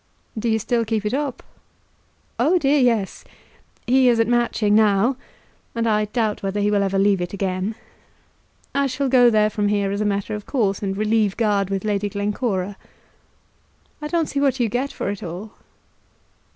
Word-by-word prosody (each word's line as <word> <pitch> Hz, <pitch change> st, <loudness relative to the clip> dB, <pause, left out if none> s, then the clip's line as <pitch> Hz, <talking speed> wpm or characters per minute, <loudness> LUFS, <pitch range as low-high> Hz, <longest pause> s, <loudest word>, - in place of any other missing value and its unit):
"Do 230 Hz, +1 st, -1 dB
you 220 Hz, -, +2 dB
still 230 Hz, +2 st, 0 dB
keep 220 Hz, -1 st, -2 dB
it 210 Hz, -, -1 dB
up?" 280 Hz, -2 st, -2 dB, 1.0 s
"Oh, 360 Hz, +4 st, +3 dB
dear, 290 Hz, -3 st, +2 dB
yes. 230 Hz, -6 st, +1 dB, 0.6 s
He 255 Hz, +1 st, +4 dB
is 235 Hz, -1 st, +3 dB
at 225 Hz, -, +3 dB
Matching 235 Hz, -3 st, +1 dB
now, 215 Hz, +3 st, +3 dB, 0.6 s
and 230 Hz, 0 st, 0 dB
I 210 Hz, -1 st, +2 dB
doubt 215 Hz, -1 st, -1 dB
whether 195 Hz, +1 st, -2 dB
he 205 Hz, 0 st, +1 dB
will 205 Hz, -1 st, +2 dB
ever 195 Hz, 0 st, 0 dB
leave 195 Hz, -1 st, +3 dB
it 175 Hz, -, -4 dB
again. 195 Hz, +2 st, -2 dB, 1.0 s
I 280 Hz, 0 st, +1 dB
shall 270 Hz, +1 st, -2 dB
go 245 Hz, -2 st, +6 dB
there 215 Hz, -1 st, +3 dB
from 205 Hz, 0 st, 0 dB
here 205 Hz, -1 st, 0 dB
as 200 Hz, +1 st, -2 dB
a -, -, 0 dB
matter 200 Hz, 0 st, -1 dB
of 210 Hz, -1 st, -6 dB
course, 205 Hz, -8 st, 0 dB
and 195 Hz, -1 st, -2 dB
relieve 215 Hz, -1 st, +1 dB
guard 205 Hz, -4 st, +1 dB
with 195 Hz, +1 st, -3 dB
Lady 205 Hz, -1 st, 0 dB
Glencora." 200 Hz, -1 st, -2 dB, 1.2 s
"I 300 Hz, -, -3 dB
don't 330 Hz, 0 st, 0 dB
see 280 Hz, -, -3 dB
what 275 Hz, -2 st, +1 dB
you 235 Hz, -2 st, +1 dB
get 255 Hz, +6 st, -2 dB
for -, -, -5 dB
it 205 Hz, -, -7 dB
all." 180 Hz, +6 st, -7 dB
215 Hz, 180 wpm, -22 LUFS, 200-240 Hz, 1.2 s, go